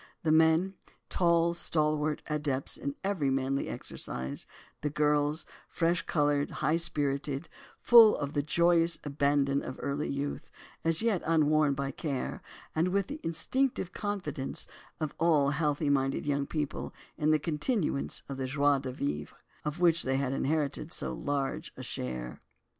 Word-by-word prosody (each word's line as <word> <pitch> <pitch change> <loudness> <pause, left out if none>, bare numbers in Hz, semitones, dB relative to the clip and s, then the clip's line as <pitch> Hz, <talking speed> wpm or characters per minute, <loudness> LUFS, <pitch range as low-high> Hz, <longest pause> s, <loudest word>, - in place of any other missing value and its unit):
The 160 - +2
men, 160 +4 +4 0.4
tall, 170 -1 +3
stalwart, 155 -2 +1
adepts 145 -3 -2
in 140 0 -4
every 190 -8 0
manly 135 +1 0
exercise; 65 +2 -5 0.3
the 150 - 0
girls, 150 +1 +1 0.2
fresh 170 0 +1
coloured, 145 -2 +2
high 155 +4 0
spirited, 145 -2 0 0.3
full 230 -3 +8
of 145 0 -3
the 145 - +1
joyous 170 +2 +3
abandon 140 -1 +1
of 130 - -7
early 140 +2 -2
youth, 140 +1 -3 0.3
as 165 +5 +1
yet 220 -6 +2
unworn 155 -2 +3
by 135 0 -2
care 140 -2 -3 0.3
and 160 +3 +2
with 195 +1 0
the 295 - -5
instinctive 190 +4 -1
confidence 180 -10 -3 0.3
of 155 -3 -2
all 155 -4 +4
healthy 150 -1 +1
minded 135 -1 +1
young 140 -1 0
people 150 -2 -3 0.2
in 155 -1 +1
the 155 - +5
continuance 155 - -1
of 135 - -5
the 130 -1 -2
joie 140 +1 +3
de 130 -1 -5
vivre, 75 - -3 0.3
of 150 +3 -3
which 170 -2 +4
they 135 0 0
had 135 -1 -1
inherited 145 +1 -1
so 65 -1 -2
large 140 - -2
a - - -7
share. 65 -1 -5
150 Hz, 145 wpm, -30 LUFS, 140-165 Hz, 0.4 s, full